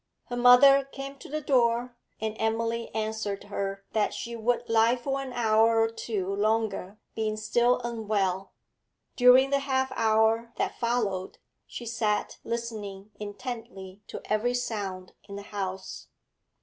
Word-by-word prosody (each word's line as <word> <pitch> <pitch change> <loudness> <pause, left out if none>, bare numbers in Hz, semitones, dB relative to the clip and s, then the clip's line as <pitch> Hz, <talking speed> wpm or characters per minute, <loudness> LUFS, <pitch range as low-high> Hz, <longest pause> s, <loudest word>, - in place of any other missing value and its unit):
Her 245 - -3
mother 250 +3 +7
came 275 0 -8
to - - -11
the 305 +2 -3
door, 245 -3 +2 0.2
and 220 0 -3
Emily 230 +1 -1
answered 215 -2 -2
her 195 -1 -4
that 215 -1 +1
she 235 0 -5
would 240 +1 0
lie 225 +1 +4
for 270 +2 -3
an 265 -1 -6
hour 225 -1 +3
or 225 0 +2
two 210 -4 -3
longer, 215 -1 -1 0.2
being 215 -1 -2
still 240 +3 +2
unwell. 210 -5 -1 0.6
During 255 +2 +6
the 280 - +3
half 265 -1 0
hour 225 +1 +2
that - - -2
followed 215 -6 -1 0.3
she 240 - -8
sat 220 -2 -1
listening 215 -4 -5
intently 210 -3 -7
to - - -7
every 230 +4 0
sound 200 -6 -4
in 200 -1 -9
the 200 - -7
house. 190 -2 -5
225 Hz, 140 wpm, -27 LUFS, 210-245 Hz, 0.6 s, mother